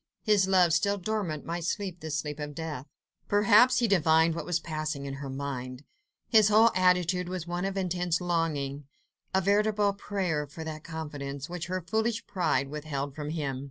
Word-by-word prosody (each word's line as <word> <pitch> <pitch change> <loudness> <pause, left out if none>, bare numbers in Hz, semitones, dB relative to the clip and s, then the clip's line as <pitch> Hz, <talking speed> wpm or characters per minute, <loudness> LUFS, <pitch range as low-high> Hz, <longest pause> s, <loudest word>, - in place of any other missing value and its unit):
His 205 -4 +3
love 180 -3 +4
still 200 +5 +2
dormant 190 -6 -3
might 170 +1 -3
sleep 185 0 -3
the 160 - -6
sleep 150 0 -3
of 150 -1 -5
death. 155 -4 -5 0.4
Perhaps 210 +5 +5
he 240 - +3
divined 160 -4 +4
what 165 - -5
was 175 -2 +1
passing 155 -3 -4
in 135 - -4
her 140 - -5
mind. 130 -1 -5 0.4
His 215 -4 +6
whole 220 +2 +6
attitude 180 -1 +2
was 180 -2 -4
one 175 +1 -3
of 195 0 -3
intense 180 -2 0
longing—a 155 0 -3
veritable 205 +1 +2
prayer 185 -7 -2
for 160 - -8
that 155 -1 -6
confidence, 145 -3 -6
which 175 -1 -4
her 185 +1 -2
foolish 220 +4 -1
pride 155 -7 0
withheld 145 -2 -4
from 150 0 -5
him. 145 -5 -3
170 Hz, 170 wpm, -28 LUFS, 150-195 Hz, 0.4 s, His